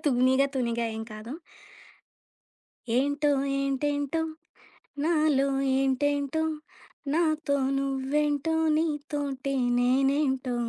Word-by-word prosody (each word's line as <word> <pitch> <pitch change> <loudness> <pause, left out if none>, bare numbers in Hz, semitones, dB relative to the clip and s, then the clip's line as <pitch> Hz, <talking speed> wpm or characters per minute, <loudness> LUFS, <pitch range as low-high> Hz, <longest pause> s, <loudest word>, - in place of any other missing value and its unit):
'తూనిగా 260 0 +3
తూనిగా' 235 -2 -1
ఏం 220 - -4
కాదు. 220 +6 -7 1.6
ఏంటో 285 +3 +1 0.3
ఏంటేంటో 285 +2 -1 0.8
నాలో 305 -4 +2 0.4
ఏంటేంటో 285 +2 0 0.7
నాతో 310 -3 +1 0.2
నువ్వెంటో 285 +3 0 0.2
నీతోోటే 290 -3 -2 0.2
నేనేంటో 265 +1 +1
280 Hz, 65 wpm, -27 LUFS, 265-295 Hz, 1.6 s, తూనిగా